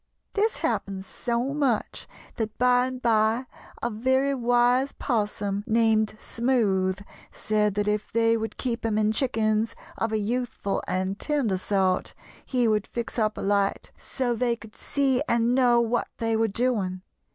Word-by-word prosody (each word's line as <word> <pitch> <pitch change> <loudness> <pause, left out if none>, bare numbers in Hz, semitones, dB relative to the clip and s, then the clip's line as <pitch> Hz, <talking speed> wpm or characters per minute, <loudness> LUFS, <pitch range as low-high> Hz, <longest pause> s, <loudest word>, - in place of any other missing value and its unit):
"This 430 +2 +1
happened 195 -1 -2
so 240 +5 -2
much 275 -7 -1 0.3
that 220 -1 -3
by 250 0 +4
and 255 0 -6
by 225 +1 +2 0.4
a 240 - 0
very 260 +5 +1
wise 245 +1 +2
'Possum, 205 -4 -1
named 220 -1 +2
Smoothe, 205 -6 0 0.3
said 210 -1 0
that 205 0 0
if 210 0 -1
they 230 0 +3
would 225 0 -4
keep 245 -2 -2
him 220 -2 0
in 215 0 +2
chickens 220 -2 +1 0.2
of 225 - 0
a 220 - +1
youthful 230 -1 -2
and 190 +2 -2
tender 260 -11 0
sort 190 -1 0 0.3
he 250 -3 +1
would 215 -2 +1
fix 235 0 -4
up 215 -1 0
a - - -4
light, 200 0 0
so 250 -2 -2
they 235 0 0
could 225 -2 -14
see 270 -2 +1
and 235 +1 +2
know 245 -2 +4
what 235 0 0
they 225 -1 0
were 225 0 +2
doing. 200 -5 -1
225 Hz, 155 wpm, -26 LUFS, 210-245 Hz, 0.4 s, by